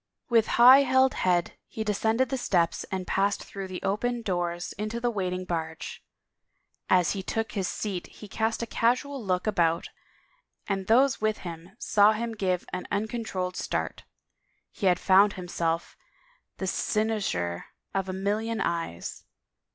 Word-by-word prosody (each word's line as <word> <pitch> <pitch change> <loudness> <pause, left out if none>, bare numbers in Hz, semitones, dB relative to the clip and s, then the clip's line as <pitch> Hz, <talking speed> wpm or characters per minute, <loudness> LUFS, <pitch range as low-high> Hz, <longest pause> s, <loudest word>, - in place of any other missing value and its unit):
With 230 -2 +4
high 255 +3 +9
held 260 -1 +4
head 175 -2 0
he 220 - -4
descended 220 +4 +1
the 265 - -1
steps 175 -7 +1
and 190 -1 -4
passed 200 +2 0
through 195 -1 -7
the 185 -1 -7
opened 235 +4 -1
doors 175 -2 -2
into 215 +2 -2
the 240 0 0
waiting 185 -3 -2
barge. 160 -2 -4 0.9
As 180 -2 +4
he 195 - -2
took 225 +4 -2
his 195 -4 -2
seat 195 -4 -4
he 210 - -12
cast 220 +3 -1
a - - -1
casual 250 +4 0
look 185 -2 0
about 170 -6 +1 0.8
and 195 -2 -2
those 260 +3 +4
with 215 0 +1
him 170 +3 -8
saw 210 -1 +4
him 230 +2 -3
give 185 -4 -1
an 180 - -4
uncontrolled 205 -4 -2
start. - - -3 0.7
He 200 - -1
had 180 -1 +4
found 195 +2 +5
himself 170 -2 -2 0.6
the 190 - -3
cynosure 195 - -1 0.3
of 195 -1 -1
a - - -2
million 210 +4 -1
eyes. 165 - -3
200 Hz, 150 wpm, -27 LUFS, 180-225 Hz, 0.9 s, high